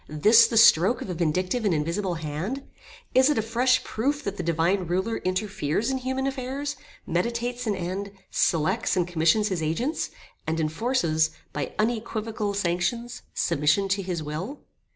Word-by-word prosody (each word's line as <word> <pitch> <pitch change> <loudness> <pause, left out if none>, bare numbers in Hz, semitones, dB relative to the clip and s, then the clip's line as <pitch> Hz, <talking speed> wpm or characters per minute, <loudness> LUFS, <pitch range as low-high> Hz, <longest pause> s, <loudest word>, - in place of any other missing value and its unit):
this 215 +10 +6
the 230 - -1
stroke 215 +1 +6
of 185 - -5
a - - -2
vindictive 180 +7 0
and 195 -6 +2
invisible 170 +5 -1
hand? 165 - -4 0.5
Is 260 +2 +5
it 300 - +1
a - - +3
fresh 250 +3 +2
proof 285 +6 -1
that 200 -4 -3
the - - -4
Divine 170 +3 +1
Ruler 190 +6 0
interferes 190 - -1
in 265 - -1
human 260 +1 -2
affairs, 275 +2 -3 0.3
meditates 235 +7 -2
an 210 - +1
end, 190 +2 -4 0.2
selects, 170 +7 +1
and 180 -1 +1
commissions 175 +5 +2
his 185 -4 -2
agents, 230 - -1 0.4
and 160 +1 0
enforces, 160 -1 +1 0.2
by 145 -2 -4
unequivocal 220 -2 -1
sanctions, 200 +6 -1
submission 155 +4 +2
to 195 +1 +1
his 180 -4 -3
will? 170 - -5
200 Hz, 155 wpm, -26 LUFS, 170-240 Hz, 0.5 s, this